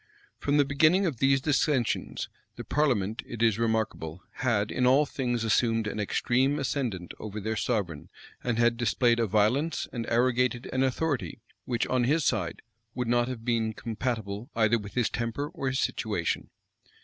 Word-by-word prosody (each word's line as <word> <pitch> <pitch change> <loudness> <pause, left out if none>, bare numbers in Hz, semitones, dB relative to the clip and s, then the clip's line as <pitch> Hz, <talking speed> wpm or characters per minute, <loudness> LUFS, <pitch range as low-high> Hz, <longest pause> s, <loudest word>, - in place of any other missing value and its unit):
From 145 +1 +1
the 145 - +5
beginning 155 +8 +4
of 155 -8 -1
these 135 +2 +3
dissensions, 135 -3 0 0.3
the - - -6
parliament, 115 -8 0
it 115 -1 -4
is 115 -1 +3
remarkable, 110 -7 -1
had 110 -5 +1
in 125 - +2
all 135 +4 +5
things 120 -5 -2
assumed 115 0 +2
an 105 - -3
extreme 130 +6 +1
ascendant 125 - -2
over 105 0 -5
their 110 +2 -2
sovereign, 100 -9 -2 0.3
and 120 -2 0
had 120 0 +3
displayed 120 0 +2
a 115 - +2
violence, 125 - +1
and 115 -2 -4
arrogated 125 +1 +1
an 130 - +1
authority, 130 - -1 0.3
which, 120 -2 0
on 125 -1 +1
his 150 +3 +2
side, 95 -8 -1 0.3
would 125 -1 -2
not 120 0 +3
have 120 -3 -6
been 115 -2 +1
compatible 110 0 -4
either 115 0 +3
with 105 -1 -10
his 120 -3 +2
temper 120 +5 -3
or 165 -5 -4
his 130 0 0
situation. - - -1
120 Hz, 165 wpm, -28 LUFS, 110-135 Hz, 0.3 s, the